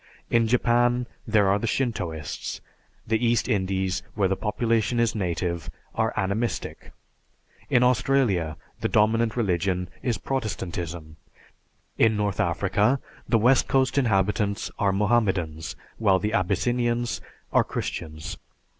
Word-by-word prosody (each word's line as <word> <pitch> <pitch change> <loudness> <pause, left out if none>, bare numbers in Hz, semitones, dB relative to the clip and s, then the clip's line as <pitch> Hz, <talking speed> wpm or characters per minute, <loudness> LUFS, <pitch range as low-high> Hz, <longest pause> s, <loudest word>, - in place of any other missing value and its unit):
In 115 -1 +4
Japan, 120 +1 +2 0.2
there 105 -2 +4
are 100 +1 +3
the 115 - -2
Shintoists. 90 - -2 0.5
The 110 +2 0
East 120 -2 +2
Indies, 95 -4 0
where 100 -3 +2
the 95 - 0
population 115 +2 0
is 115 -1 +2
native, 85 -4 -2 0.2
are - - +1
Animistic. 100 +5 -2 0.8
In 125 - +4
Australia, 125 -10 +2 0.2
the - - -1
dominant 110 +2 +2
religion 90 -3 0
is 120 -3 0
Protestantism. 85 -10 -4 0.8
In 110 -1 +4
North 100 -4 -1
Africa, 105 +8 +2 0.3
the 115 - +4
west 125 +4 +4
coast 130 -1 +2
inhabitants 105 -4 +1
are 100 -1 +3
Mohammedans, 95 -7 0 0.2
while 100 -4 +4
the 105 +3 -2
Abyssinians 120 +5 0 0.3
are - - +5
Christians. 80 +3 -5
105 Hz, 120 wpm, -25 LUFS, 95-120 Hz, 0.8 s, are